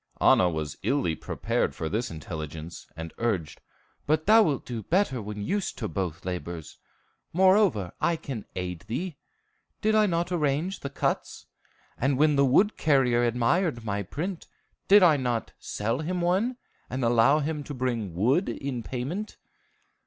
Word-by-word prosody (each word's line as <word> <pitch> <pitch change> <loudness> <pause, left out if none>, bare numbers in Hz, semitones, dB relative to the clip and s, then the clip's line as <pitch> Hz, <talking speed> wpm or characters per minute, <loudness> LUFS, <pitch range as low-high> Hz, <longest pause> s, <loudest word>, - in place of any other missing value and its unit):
Anna 90 - +5
was 80 -3 -4
illy 135 - +1
prepared - - -2
for 80 - -3
this 110 +8 -1
intelligence, 80 +1 -7
and 80 0 -6
urged, 95 -10 -1 0.5
"But 155 +1 +2
thou 220 +2 +7
wilt 150 - +1
do 120 -2 -4
better 165 - +1
when 105 0 -5
used 200 - -2
to 110 - -3
both 90 -5 -4
labors. 85 -3 -5 0.5
Moreover, 185 - +4
I 170 +2 +2
can 130 -9 -6
aid 90 -2 -4
thee. 150 +7 -3 0.6
Did 220 0 +2
I 215 -1 +5
not 175 0 -1
arrange 160 +3 0
the 140 - -5
cuts? 140 - -2 0.5
And 135 +1 +1
when 150 +1 +4
the 140 0 +4
wood 190 +11 +3
carrier 130 -5 +3
admired 120 +3 +1
my 100 -1 -1
print, 165 - -5 0.4
did 200 0 +7
I 160 -4 +6
not 120 -4 -2
sell 115 +5 -2
him 175 +4 -2
one, 190 +9 +1 0.3
and 130 -1 -2
allow 120 +5 +5
him 150 0 -2
to 145 - -6
bring 120 -8 -2
wood 130 - +2
in 135 -3 -4
payment?" 140 - -4
130 Hz, 155 wpm, -27 LUFS, 105-170 Hz, 0.6 s, thou